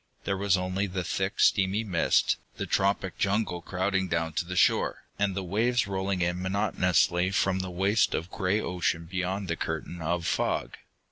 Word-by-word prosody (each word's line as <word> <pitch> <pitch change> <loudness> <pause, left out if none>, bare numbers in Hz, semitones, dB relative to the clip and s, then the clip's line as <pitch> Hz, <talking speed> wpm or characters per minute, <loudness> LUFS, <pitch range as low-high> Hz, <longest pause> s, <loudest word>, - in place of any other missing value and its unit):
There 100 - -1
was 100 0 +2
only 95 +2 -1
the 90 -1 -3
thick, 95 +3 -2
steamy 95 +3 +3
mist, 95 -6 +2 0.2
the - - -2
tropic 95 -1 0
jungle 100 -3 0
crowding 95 +1 -1
down 80 -2 -1
to 85 - -1
the 90 +1 -5
shore, - - +2 0.2
and 100 -2 +1
the 100 - -2
waves 115 +7 +1
rolling 95 -1 -2
in 90 +1 -1
monotonously 90 -2 +2
from 95 -1 +1
the 95 0 -3
waste 95 +4 +2
of 85 +4 -4
gray 100 +1 0
ocean 90 -4 -1
beyond 95 +2 -3
the 85 - -1
curtain 80 +1 -4
of 85 +1 -1
fog. - - -1
95 Hz, 175 wpm, -28 LUFS, 90-100 Hz, 0.2 s, steamy